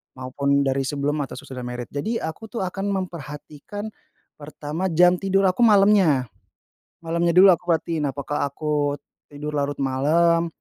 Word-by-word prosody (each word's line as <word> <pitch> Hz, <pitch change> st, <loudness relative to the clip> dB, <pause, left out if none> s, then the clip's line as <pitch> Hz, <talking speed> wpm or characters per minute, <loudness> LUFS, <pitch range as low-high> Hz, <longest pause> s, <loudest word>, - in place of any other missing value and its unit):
maupun 140 Hz, +2 st, 0 dB
dari 135 Hz, 0 st, 0 dB
sebelum 145 Hz, +2 st, -1 dB
atau 140 Hz, -, -4 dB
sesudah 125 Hz, -2 st, -8 dB
married. 125 Hz, 0 st, -6 dB
Jadi 215 Hz, +12 st, -3 dB
aku 160 Hz, +8 st, -6 dB
tuh 225 Hz, -2 st, -4 dB
akan 195 Hz, +2 st, -3 dB
memperhatikan 180 Hz, +1 st, -6 dB, 0.5 s
pertama 150 Hz, +4 st, -4 dB
jam 180 Hz, +1 st, +4 dB
tidur 195 Hz, 0 st, +1 dB
aku 235 Hz, +6 st, +3 dB
malamnya. 195 Hz, -, +4 dB, 0.7 s
Malamnya 170 Hz, +1 st, 0 dB
dulu 190 Hz, +1 st, +8 dB
aku 175 Hz, 0 st, -1 dB
perhatiin, 160 Hz, -2 st, -2 dB
apakah 140 Hz, +1 st, -2 dB
aku 145 Hz, 0 st, -1 dB, 0.3 s
tidur 150 Hz, +1 st, -6 dB
larut 145 Hz, 0 st, -2 dB
malem 160 Hz, +6 st, +2 dB
155 Hz, 140 wpm, -23 LUFS, 140-185 Hz, 0.7 s, dulu